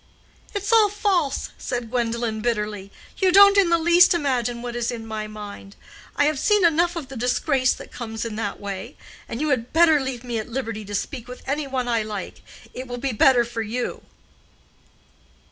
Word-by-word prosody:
"It's 405 +2 -1
all 435 -2 +6
false!" 385 -8 0
said 240 -3 -4
Gwendolen, 235 -2 -1
bitterly. 210 -4 -2 0.3
"You 375 -2 +3
don't 400 +1 +8
in 395 -3 +4
the 335 - +4
least 345 +2 +5
imagine 245 -6 -1
what 240 -1 -5
is 240 -1 -1
in 230 -2 -5
my 215 -1 -4
mind. 205 -2 -9 0.4
I 290 - +3
have 300 -2 +1
seen 415 +1 +3
enough 340 +1 +2
of 310 -6 -6
the 270 - -8
disgrace 255 +2 +1
that - - -12
comes 225 -2 -5
in 225 -2 -5
that 210 -2 -3
way. 200 +6 -6 0.3
And 230 - -4
you 305 +1 0
had 250 -4 -1
better 320 -2 +5
leave 260 -3 -4
me 240 -2 -3
at 215 - -6
liberty 230 -3 -4
to 205 +1 -5
speak 240 +4 -4
with 250 0 -10
any 285 +1 -2
one 260 -2 -2
I 230 -2 +1
like. 210 -3 -6 0.3
It 255 +1 -7
will 245 0 -5
be 265 +2 -2
better 240 +2 +4
for 230 -1 -4
you." 235 +3 -3
245 Hz, 195 wpm, -23 LUFS, 225-305 Hz, 0.4 s, don't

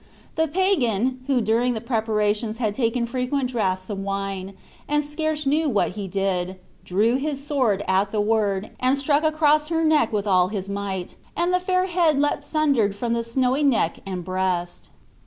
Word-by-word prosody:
The 320 0 +1
pagan, 260 - +1
who 265 -3 +2
during 230 +3 +1
the - - -2
preparations 220 -1 -1
had 220 -4 -1
taken 235 0 0
frequent 255 +2 -2
draughts 185 -6 -1
of 205 -3 -4
wine, 195 -1 -4 0.3
and 295 0 +2
scarce 305 +1 -2
knew 300 +3 +2
what 210 -6 +1
he 200 +1 -5
did, 190 -1 -1 0.3
drew 215 +7 +2
his 280 0 -3
sword 250 -9 +1
at 190 +2 +2
the 215 - -2
word, 205 -2 0
and 255 +2 +2
struck 285 +2 +1
across 305 -1 +3
her 325 0 0
neck 310 -7 +3
with 210 -2 -1
all 185 -3 +3
his 195 -1 -4
might, 200 -2 -4 0.2
and 345 +2 +1
the 360 - +3
fair 365 0 +1
head 340 -5 +2
leapt 290 0 0
sundered 280 -10 +1
from 230 +2 -2
the 235 0 0
snowy 255 +4 0
neck 250 - +2
and 185 -3 -5
breast. 185 -2 -2
235 Hz, 175 wpm, -23 LUFS, 200-290 Hz, 0.3 s, across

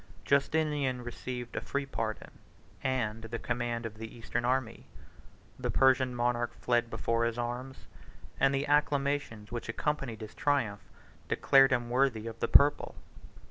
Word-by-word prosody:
Justinian 140 -3 +1
received 120 0 -6
a - - -1
free 140 0 -2
pardon, 115 -5 -4 0.5
and 115 -4 -1
the 115 +1 -4
command 120 -1 -2
of 110 -1 -7
the 110 +1 -8
eastern 115 +1 -3
army. 125 -2 -1 0.7
The - - -2
Persian 130 -1 +3
monarch 120 0 0
fled 120 -1 +1
before 115 +1 0
his 115 0 -1
arms; 125 +2 -5 0.5
and 135 0 +4
the 140 +1 0
acclamations 140 -6 0
which 120 -1 -5
accompanied 125 -3 -2
his 110 0 -8
triumph 120 -9 0 0.5
declared 135 -1 +5
him 120 -2 0
worthy 125 -4 +2
of 115 -1 -7
the - - 0
purple. 145 +1 +5
120 Hz, 140 wpm, -30 LUFS, 115-135 Hz, 0.7 s, declared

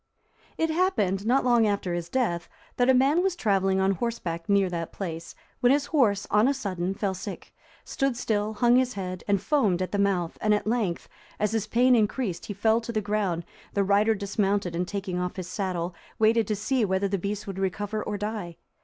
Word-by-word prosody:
It 325 0 +1
happened, 220 - +1
not 260 +3 +3
long 240 -3 +4
after 200 -3 -1
his 175 0 -4
death, 175 -9 -1 0.3
that 245 +1 +3
a - - +7
man 275 +7 +4
was 380 -1 0
travelling 195 - +1
on 190 0 +3
horseback 185 -5 -3
near 200 -1 +4
that 170 -2 -4
place, 170 -3 -6 0.2
when 245 - +4
his 285 +1 +2
horse 230 -10 +2
on 210 +3 +4
a 280 - +2
sudden 190 -6 -3
fell 195 -1 -1
sick, 190 +2 -8 0.3
stood 270 -3 -1
still, 215 -2 -1
hung 240 +3 +4
his 255 -1 +1
head, 185 -2 -5
and 200 -1 +2
foamed 215 - +1
at 185 - -2
the 205 - -1
mouth, 185 -4 0
and, 210 0 +3
at 210 - -3
length, 215 -6 -1 0.3
as 210 0 +1
his 220 -2 -1
pain 250 +3 +4
increased, 215 -3 -1
he 205 - -4
fell 220 +3 +2
to 235 - -5
the 220 - 0
ground; 200 -5 -1 0.3
the 200 - +3
rider 205 +3 +3
dismounted, 200 -2 -1
and 180 +1 -1
taking 195 -3 -3
off 180 0 -3
his 185 -3 -5
saddle,(342) 180 -2 -3 0.2
waited 220 0 +3
to 215 - 0
see 245 +4 0
whether 190 0 +1
the 195 0 -1
beast 205 +3 -3
would 195 -2 -6
recover 205 +3 -2
or 210 - -3
die. 205 -5 -4
205 Hz, 205 wpm, -26 LUFS, 190-230 Hz, 0.3 s, a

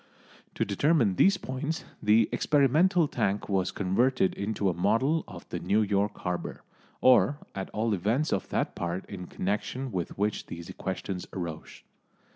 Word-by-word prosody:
To - - 0
determine 115 - +2
these 195 0 +5
points 145 +3 -4 0.2
the 105 +1 +4
experimental 155 +5 +3
tank 105 -6 -1
was 95 -2 +1
converted 100 +4 +1
into 100 0 -2
a 90 - +2
model 130 - +2
of - - -11
the - - -3
New 110 +2 +2
York 100 0 0
Harbour, 90 -1 -4 0.4
or 130 +2 +5 0.2
at 95 -1 -5
all 110 +1 0
events 110 - 0
of - - -2
that - - -1
part 85 +2 -3
in 90 -3 -7
connection 105 +7 -3
with 90 -4 -4
which 105 +1 -1
these 85 0 -7
questions 95 0 -4
arose. 85 -4 -6
105 Hz, 150 wpm, -28 LUFS, 95-130 Hz, 0.4 s, these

